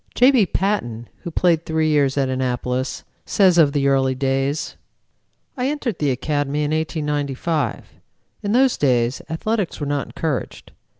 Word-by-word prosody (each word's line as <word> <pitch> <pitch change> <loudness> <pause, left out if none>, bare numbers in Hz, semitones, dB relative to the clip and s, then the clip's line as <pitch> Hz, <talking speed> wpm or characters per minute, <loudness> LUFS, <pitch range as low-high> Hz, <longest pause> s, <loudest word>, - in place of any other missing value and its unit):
J. 250 +3 +6
B. 245 -7 +4
Patton, 120 - -2
who - - -6
played 170 -1 +2
three 160 -1 0
years 145 -2 +2
at 135 -1 +2
Annapolis, 130 0 -2 0.2
says 185 -4 +3
of 150 -3 +5
the 140 -1 +1
early 135 -1 +2
days: 135 +2 -1 0.8
"I 250 0 -1
entered 275 - -2
the 145 - +1
Academy 145 +2 -1
in 145 - -1
1895. 150 -1 -1 0.6
In 205 -1 -1
those 260 +1 +4
days 125 -3 +1
athletics 200 +4 -2
were 145 - -2
not 145 -1 -2
encouraged. 155 -6 -4
150 Hz, 145 wpm, -21 LUFS, 135-170 Hz, 0.8 s, J